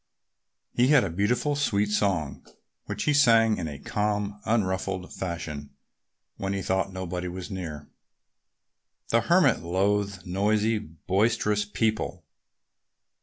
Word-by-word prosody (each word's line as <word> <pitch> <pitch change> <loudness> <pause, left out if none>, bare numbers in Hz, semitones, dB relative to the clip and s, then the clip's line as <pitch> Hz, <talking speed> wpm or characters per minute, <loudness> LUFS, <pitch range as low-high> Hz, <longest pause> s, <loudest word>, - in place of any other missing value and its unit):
He 120 +1 +3
had 145 -2 +6
a 95 - -2
beautiful, 120 - +1
sweet 105 -8 +1
song, 95 -8 0 0.4
which - - -3
he 150 - +2
sang 115 -6 +5
in 80 - -3
a 75 -2 -6
calm, 105 +4 -2
unruffled 95 -4 -1
fashion 75 -6 -5 0.6
when 95 0 -2
he 95 -1 -2
thought 95 +1 0
nobody 90 -1 -4
was 90 +3 -6
near. 80 -6 -6 1.2
The - - +3
Hermit - - +4
loathed 100 +1 0
noisy, 105 +4 +1
boisterous 105 +4 0
people. 110 +1 -1
100 Hz, 120 wpm, -27 LUFS, 90-110 Hz, 1.2 s, had